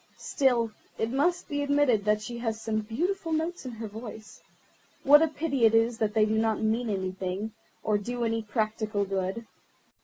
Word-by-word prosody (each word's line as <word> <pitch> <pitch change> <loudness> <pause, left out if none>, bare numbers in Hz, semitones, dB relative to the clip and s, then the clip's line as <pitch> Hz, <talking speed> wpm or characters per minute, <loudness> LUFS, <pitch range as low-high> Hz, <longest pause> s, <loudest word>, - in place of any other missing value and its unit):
Still, 245 -5 +1 0.3
it 225 +1 -1
must 345 +7 +1
be 290 -3 -2
admitted 285 -7 +2
that 210 0 +2
she 235 +1 -6
has 225 -2 -2
some 220 -1 -1
beautiful 330 - -2
notes 320 0 -2
in - - -4
her 225 0 -6
voice. 215 0 -9 0.6
What 295 +2 +8
a 325 - +4
pity 295 -4 -2
it 225 0 +6
is 225 +1 +2
that 215 0 0
they 215 -1 +5
do 220 +1 +1
not 220 -1 +1
mean 225 +2 0
anything, 190 +1 -3 0.3
or 210 -1 +2
do 240 +3 -3
any 225 0 0
practical 215 -1 -1
good." 195 +3 -2
225 Hz, 180 wpm, -28 LUFS, 215-265 Hz, 0.6 s, What